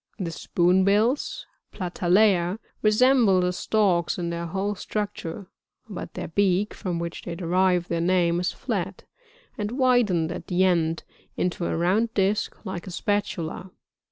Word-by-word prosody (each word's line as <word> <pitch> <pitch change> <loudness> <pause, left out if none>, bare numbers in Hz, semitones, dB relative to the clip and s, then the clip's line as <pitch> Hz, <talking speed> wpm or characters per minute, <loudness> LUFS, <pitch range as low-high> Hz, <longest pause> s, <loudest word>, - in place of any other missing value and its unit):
44. 190 - -3
The 165 - -3
Spoonbills, 200 - +1
— - - -55
Platalea, 180 0 +2
— - - -41
resemble 225 -3 +5
the 180 0 0
Storks 185 -4 +1
in 170 -1 -2
their 170 0 -4
whole 195 +4 -2
structure; 205 -3 -5 0.4
but 200 -5 -7
their - - -5
beak, 195 +3 +1
from 180 -5 -3
which 170 0 -5
they 170 - -6
derive 180 0 +1
their 170 -1 -1
name, 175 -1 +2
is 180 +1 0
flat, 195 -6 -4 0.6
and 210 +2 -2
widened 240 - +2
at - - -7
the 180 +1 +2
end 165 -3 +1 0.3
into 180 -1 -1
a - - -1
round 200 +7 +1
disk 200 +2 0
like 190 -1 -5
a - - -6
spatula, 195 -4 -1
(Plate - - -8
5, - - -14
Jig - - -35
185 Hz, 165 wpm, -25 LUFS, 175-205 Hz, 0.6 s, resemble